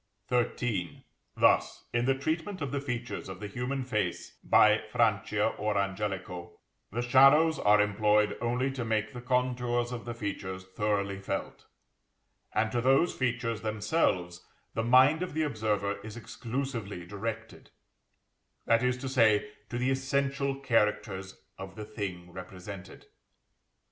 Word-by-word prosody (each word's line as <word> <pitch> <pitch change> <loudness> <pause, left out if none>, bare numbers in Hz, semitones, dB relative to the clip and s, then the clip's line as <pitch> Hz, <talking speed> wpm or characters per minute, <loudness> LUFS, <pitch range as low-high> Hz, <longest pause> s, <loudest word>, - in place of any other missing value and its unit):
XIII. 120 -7 -1 0.3
Thus, - - +3
in 120 0 +1
the 135 0 +3
treatment 160 +7 -2
of 140 -5 -3
the 140 - -1
features 120 -6 -4
of 95 -1 -7
the 105 - -6
human 125 +6 -3
face 105 -8 -2
by - - +5
Francia - - +2
or 105 -1 0
Angelico, 95 -3 -3 0.3
the 120 +4 -2
shadows 135 +6 +6
are 105 0 +5
employed 105 +1 +3
only 125 +3 0
to 130 -2 -4
make 110 -1 -1
the 125 - -7
contours 125 -1 0
of 120 -2 -6
the 120 -1 -5
features 95 -3 -4
thoroughly 100 0 -1
felt; 100 - -5 0.8
and 110 0 +1
to 120 - 0
those 135 +7 +4
features 120 -3 -1
themselves 100 - 0 0.3
the 115 - 0
mind 130 +7 +5
of 180 -4 -4
the 160 - +1
observer 105 -7 -1
is 110 +1 -8
exclusively 115 -6 -4
directed 110 +4 -6 1.0
(that 115 0 +4
is 125 0 +1
to 135 +1 -5
say, 110 -5 +3 0.2
to 120 - -3
the 125 +2 +1
essential 140 +1 0
characters 105 -6 0 0.2
of 95 0 -8
the 105 - -6
thing 95 -5 -6
represented). 95 +1 -9
115 Hz, 140 wpm, -30 LUFS, 100-130 Hz, 1.0 s, shadows